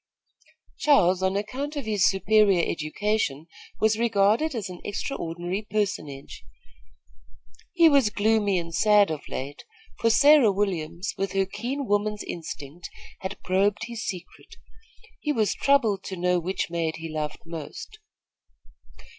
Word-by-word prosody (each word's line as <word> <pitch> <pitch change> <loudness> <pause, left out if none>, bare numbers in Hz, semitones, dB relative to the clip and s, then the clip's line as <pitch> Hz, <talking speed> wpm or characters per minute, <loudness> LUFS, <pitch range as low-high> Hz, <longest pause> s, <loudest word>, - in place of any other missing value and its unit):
Charles, 190 -11 +4
on 190 +1 +1
account 270 +8 -4
of 285 -4 -4
his 210 -4 +3
superior 195 -2 +3
education, 160 -2 -2 0.3
was 220 0 +2
regarded 230 +6 +2
as 220 -4 -3
an 180 -1 -9
extraordinary 185 -2 -4
personage. 175 -10 -3 1.3
He 335 -2 +6
was 280 -7 +4
gloomy 210 -2 +1
and 170 -1 -4
sad 210 -1 +4
of 155 -2 -4
late, 140 +2 -6 0.4
for 230 - +3
Sarah 285 -2 +6
Williams, 180 -3 -2
with 195 -1 -2
her 195 0 +2
keen 260 +8 -4
woman's 205 0 0
instinct, 165 0 -7 0.3
had 190 +1 -5
probed 200 +3 +1
his 235 -1 -6
secret. 185 -2 -8 0.6
He 300 - -1
was 220 -7 +1
troubled 230 -9 +2
to 190 - -5
know 180 0 +1
which 175 0 -3
maid 165 -2 -1
he 165 0 -7
loved 155 -1 -5
most. 165 - -8
200 Hz, 130 wpm, -25 LUFS, 175-220 Hz, 1.3 s, He